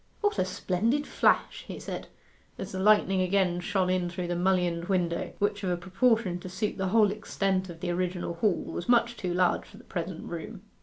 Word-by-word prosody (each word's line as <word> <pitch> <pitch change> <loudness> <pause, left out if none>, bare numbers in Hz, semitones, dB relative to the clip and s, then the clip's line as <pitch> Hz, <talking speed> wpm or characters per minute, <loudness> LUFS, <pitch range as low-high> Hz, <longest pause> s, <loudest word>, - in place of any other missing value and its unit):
'What 415 -1 +1
a - - +3
splendid 225 +10 0
flash!' - - +2
he - - -6
said, - - -6 0.5
as - - -6
the 190 - -4
lightning 195 -2 +4
again 185 -1 +2
shone 185 0 0
in 180 -1 0
through 175 0 -4
the 175 - 0
mullioned 175 -2 +1
window, 175 -3 -1
which, 205 0 0
of 185 - 0
a 175 - 0
proportion 195 +1 +1
to 185 - -8
suit 195 +3 -3
the 190 - 0
whole 210 +1 +4
extent 195 -2 -1
of 170 -1 -10
the 180 -1 -1
original 180 0 -2
hall, 190 +3 +1
was 175 - -6
much 235 0 +4
too 185 -5 -3
large 180 0 +2
for - - -15
the - - -14
present 175 -1 -5
room. 185 +4 -7
185 Hz, 205 wpm, -28 LUFS, 175-205 Hz, 0.5 s, lightning